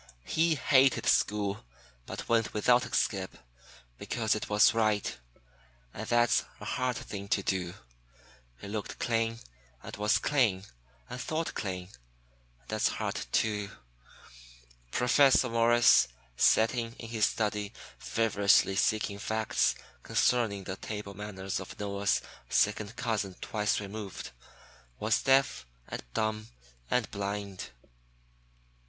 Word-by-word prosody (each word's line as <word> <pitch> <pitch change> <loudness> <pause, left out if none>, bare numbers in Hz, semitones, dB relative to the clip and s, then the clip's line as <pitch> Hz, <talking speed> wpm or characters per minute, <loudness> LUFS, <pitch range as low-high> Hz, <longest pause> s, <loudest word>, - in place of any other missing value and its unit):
He 165 0 +2
hated 135 -1 +4
school, 100 0 +1 0.4
but - - -6
went 115 -2 +1
without 120 +3 +3
a - - -13
skip, 95 -3 -1 0.6
because 110 -3 0
it 105 - -4
was 105 +2 +5
right. 110 -2 +1 0.8
And 110 - -6
that's 120 0 +3 0.2
a - - -9
hard 125 -1 -1
thing 100 -3 -7
to 100 0 +1
do. 90 -2 -2 0.8
He - - -9
looked 105 0 -5
clean, 115 -1 0 0.5
and - - -7
was 105 +2 +3
clean, 115 -10 +1 0.4
and 125 - -6
thought 160 +1 -2
clean. 90 -3 -4 0.7
And 65 - -29
that's - - +1
hard, - - -3
too. 105 -2 0 1.2
Professor 130 - +4
Morris, 115 - +5 0.3
sitting 115 - +3
in 115 - -8
his 110 -2 +2
study 105 -2 -2 0.3
feverishly 100 -3 +3
seeking 105 -1 +1
facts 110 +1 +1 0.3
concerning 110 -6 +1
the 95 +1 -5
table 105 -1 -6
manners 95 -2 -5
of 95 - -9
Noah's 100 -1 0 0.3
second 105 +1 +1
cousin 110 -6 -2
twice 105 -2 -1
removed, 100 - -7 0.7
was 110 +1 +1
deaf 135 - +2 0.2
and - - -5
dumb 110 0 -1 0.4
and 125 -3 0
blind. 100 -1 -4
105 Hz, 120 wpm, -30 LUFS, 100-115 Hz, 1.2 s, was